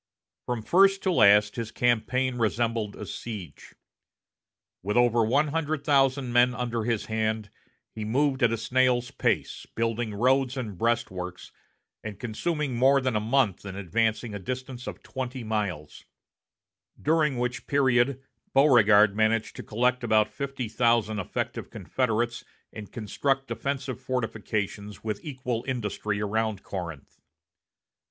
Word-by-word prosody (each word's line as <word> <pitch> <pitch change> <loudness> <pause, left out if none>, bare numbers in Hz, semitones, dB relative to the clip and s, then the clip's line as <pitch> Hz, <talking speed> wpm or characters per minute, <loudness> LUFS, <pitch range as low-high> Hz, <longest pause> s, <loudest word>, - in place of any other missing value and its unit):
From 120 -3 -2
first 195 - +4
to 190 - +2
last, 105 - +5
his 115 -2 -3
campaign 125 +2 0
resembled 115 -1 0
a - - -7
siege. 100 -10 -8 1.1
With 105 +5 -1
over 120 -1 +4
one 145 +7 +2
hundred 155 -1 -2
thousand 135 -3 +2
men 125 +1 +4
under 120 -2 -2
his 115 -3 -1
hand, 110 -1 -2 0.4
he 110 - -5
moved 135 +5 +1
at 120 -2 +4
a 115 - 0
snail's 125 +1 +1
pace, - - -1
building 115 -1 -1
roads 130 +3 +2
and 110 -6 -4
breastworks, 95 -5 -2 0.5
and 105 -2 -7
consuming 140 +4 -2
more 135 +3 +5
than 130 -3 -1
a - - +3
month 110 -3 +1
in 95 -2 -7
advancing 110 +4 -1
a 100 - -4
distance 130 +3 -6
of - - -7
twenty 130 -1 -5
miles; 100 -9 -3 1.0
during 150 -3 +2
which 125 +1 -3
period 135 -1 +2 0.3
Beauregard 110 -7 +6
managed 110 +1 +1
to - - -5
collect 125 +3 0
about 110 -2 +2
fifty 135 -3 -4
thousand 115 -1 +1
effective 95 - -4
Confederates 120 -2 -1 0.3
and 105 -2 -9
construct 135 +5 -1
defensive 130 +2 -3
fortifications 110 -5 -3
with 105 -2 -4
equal 125 -5 -3
industry 105 -4 -2
around 105 -1 -1
Corinth. 85 -7 -7
120 Hz, 130 wpm, -27 LUFS, 110-130 Hz, 1.1 s, Beauregard